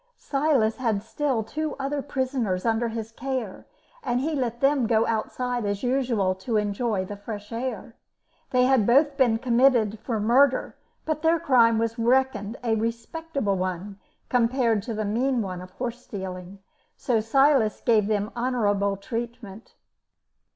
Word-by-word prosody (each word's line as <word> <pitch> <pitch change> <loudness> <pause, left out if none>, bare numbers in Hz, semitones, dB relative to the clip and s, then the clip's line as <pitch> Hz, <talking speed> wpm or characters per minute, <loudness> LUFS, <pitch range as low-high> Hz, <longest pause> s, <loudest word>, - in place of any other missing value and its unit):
Silas 275 -6 +1
had 225 -6 -1
still 250 0 -1
two 305 +6 -4
other 280 +1 -2
prisoners 255 -9 -2
under 230 +1 +1
his 225 -1 -5
care, 250 -4 -5 0.3
and 245 - 0
he 310 +5 -1
let 240 -4 -2
them 275 -3 +2
go 225 0 +3
outside 245 +2 -2
as 205 +1 -2
usual 245 -7 +1
to 215 +4 -2
enjoy 210 -1 -1
the 205 - -7
fresh 205 +1 -8
air. 230 -1 -5 0.5
They 250 -1 +3
had 255 -5 +3
both 280 +4 +4
been 250 -5 +3
committed 235 -3 +3
for 225 -1 -3
murder, 255 +5 +3 0.3
but 310 -1 -2
their 325 +1 +3
crime 235 -5 +4
was 230 +1 -1
reckoned 240 -2 +1
a 230 -2 +1
respectable 230 +1 -2
one 185 +2 -4 0.3
compared 235 -2 +2
to 225 - -2
the 215 0 -2
mean 240 +3 0
one 185 -2 -5
of 185 - -10
horse 245 +5 -5
stealing, 185 -1 -7 0.4
so 235 -3 +1
Silas 260 0 +3
gave 215 -4 +3
them 210 0 -1
honourable 205 -5 0
treatment. 230 -1 -7
230 Hz, 150 wpm, -25 LUFS, 210-260 Hz, 0.5 s, both